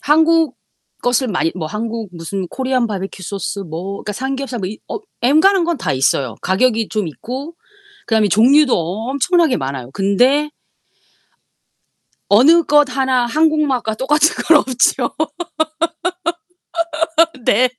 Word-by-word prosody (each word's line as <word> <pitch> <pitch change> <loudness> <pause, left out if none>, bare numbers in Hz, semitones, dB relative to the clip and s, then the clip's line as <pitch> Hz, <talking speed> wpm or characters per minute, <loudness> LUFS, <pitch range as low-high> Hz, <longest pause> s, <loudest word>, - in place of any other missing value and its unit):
한국 320 0 +3 0.5
것을 245 +1 +1
많이 180 -4 0
뭐 170 -4 -4
한국 225 +4 -4
무슨 180 +3 -5
코리안 255 -2 -1
바비큐 195 -2 -6
소스 200 +2 -4
뭐 180 +3 -6
그러니까 210 - -4
삼겹살 265 +1 -4
뭐 185 - -3
이 215 - -8
어 - - -4 0.2
엔간한 335 +8 +4
건 340 -1 -1
다 - - -2
있어요. 130 -2 0
가격이 225 +3 +1
좀 210 -5 -2
있고 260 - -7 0.5
그다음에 220 -2 +2
종류도 255 - +4 0.4
엄청나게 315 +1 +2
많아요. 135 -2 -5
근데 250 - +2 1.8
어느 305 +11 +6
것 295 -1 +4
하나 260 -2 +1
한국 310 +4 +2
맛과 240 -5 -1
똑같은 300 +7 +2
건 320 -2 +6
없죠. 255 -1 0 2.3
네. 250 +5 +3
245 Hz, 255 characters per minute, -17 LUFS, 200-290 Hz, 2.3 s, 어느